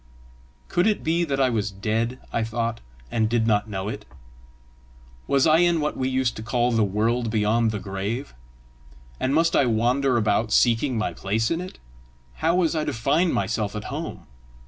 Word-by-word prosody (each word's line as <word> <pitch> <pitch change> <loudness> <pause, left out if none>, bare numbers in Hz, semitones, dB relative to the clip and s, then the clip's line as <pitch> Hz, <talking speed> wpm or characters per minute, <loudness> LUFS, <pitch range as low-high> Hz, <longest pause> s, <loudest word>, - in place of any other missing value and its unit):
Could 175 +4 +1
it 215 - 0
be 165 +2 +1
that 140 -3 -2
I 130 -2 +3
was 110 -2 -1
dead, 110 +5 -2 0.2
I 115 - +1
thought, 115 +1 -2 0.3
and 110 -1 +1
did 115 -1 +1
not 105 -1 +1
know 95 -1 -4
it? 105 0 -5 1.2
Was 140 -1 +3
I 160 0 +5
in 175 -1 +3
what 150 0 -1
we 130 0 -1
used 130 -2 0
to - - -5
call 120 +2 0
the 115 -2 +2
world 115 +4 0
beyond 110 +1 +2
the 110 - -2
grave? 100 +7 -4 0.9
and 130 - 0
must 165 +3 +2
I 135 - +4
wander 120 +3 +2
about 110 0 +1
seeking 120 +3 +3
my 105 - -1
place 110 +4 -1
in 165 +1 0
it? 185 - -8 0.6
How 165 +2 +1
was 175 -2 +2
I 155 - 0
to - - -2
find 150 +10 +1
myself 110 -2 -1
at 105 - -4
home? - - -6
115 Hz, 185 wpm, -24 LUFS, 110-140 Hz, 1.2 s, I